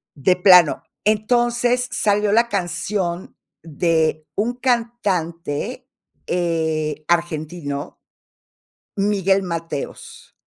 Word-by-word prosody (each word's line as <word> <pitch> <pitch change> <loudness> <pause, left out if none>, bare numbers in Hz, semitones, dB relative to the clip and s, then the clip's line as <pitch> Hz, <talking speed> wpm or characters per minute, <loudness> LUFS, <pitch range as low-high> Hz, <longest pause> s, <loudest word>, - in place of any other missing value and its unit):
De 155 +6 +2
plano, 180 -4 +6 0.2
entonces 240 +3 +2
salió 205 0 +1
la 235 +2 +3
canción 175 0 -3 0.3
de 160 -1 0
un 225 +4 0
cantante, 230 - -2 0.4
eh, 160 -3 -1
argentino 155 -3 -2 1.0
Miguel 195 -1 +2
Mateos. 165 -4 -6
180 Hz, 75 wpm, -21 LUFS, 165-215 Hz, 1.0 s, plano